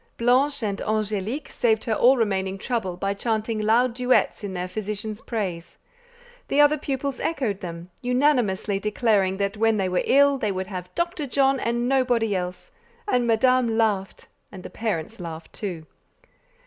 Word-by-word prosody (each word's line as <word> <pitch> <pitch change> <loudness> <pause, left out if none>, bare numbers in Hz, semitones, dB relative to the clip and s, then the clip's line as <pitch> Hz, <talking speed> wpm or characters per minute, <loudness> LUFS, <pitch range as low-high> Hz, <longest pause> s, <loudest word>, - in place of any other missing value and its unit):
Blanche 255 +3 +2
and 200 -2 -2
Angélique 215 +5 -2
saved 220 -2 +1
her 225 - 0
all 255 +5 +5
remaining 195 -4 0
trouble 200 -5 -3
by 195 +2 -1
chanting 220 +1 -2
loud 230 +3 +3
duets 250 -2 +1
in 195 -2 -5
their 180 0 -3
physician's 215 +2 -5
praise; 180 -7 -4 0.7
the 280 - +1
other 295 +1 +6
pupils 275 -2 -3
echoed 245 - -1
them, 170 0 -7
unanimously 245 -7 +1
declaring 205 -2 +1
that 200 +1 -2
when 225 0 +2
they 190 -2 0
were 180 0 0
ill 280 0 +4
they 210 - 0
would 190 0 -3
have 180 -2 -7
Dr. 340 -3 -2
John 270 0 +2
and 240 +1 -1
nobody 245 -5 +2
else; 180 0 -5 0.4
and 250 -10 +1
Madame 235 0 +3
laughed, 205 -4 -1 0.2
and 185 -2 -10
the - - -9
parents 220 -2 -3
laughed 165 -2 -8
too. 175 -6 -5
220 Hz, 160 wpm, -24 LUFS, 195-250 Hz, 0.7 s, other